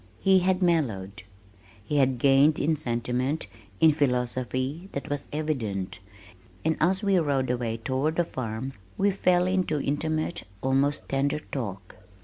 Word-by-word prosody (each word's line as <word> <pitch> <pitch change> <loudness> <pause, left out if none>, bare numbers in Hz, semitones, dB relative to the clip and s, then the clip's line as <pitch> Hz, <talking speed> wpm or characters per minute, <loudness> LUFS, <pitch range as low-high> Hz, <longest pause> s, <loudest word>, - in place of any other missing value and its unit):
He 190 -1 +5
had 185 +1 +1
mellowed. 110 - 0 0.6
He 145 +8 -1
had 130 -2 +3
gained 140 +4 +5
in 160 +2 +2
sentiment, 125 +2 -1 0.3
in 160 -1 +7
philosophy, 130 - -1
that 140 - -4
was 145 -1 -3
evident, 110 -12 -2 0.7
and 160 0 +2
as 185 +5 +2
we 195 -2 +3
rode 140 -5 +1
away 120 -2 -2
toward 130 +7 -1
the 175 - +3
farm 130 -3 -5 0.2
we 200 +1 +3
fell 180 -2 +2
into 185 -5 +1
intimate, 155 +4 -1 0.2
almost 135 +2 +1
tender 140 +2 0
talk. 100 -11 -6
140 Hz, 135 wpm, -27 LUFS, 125-160 Hz, 0.7 s, in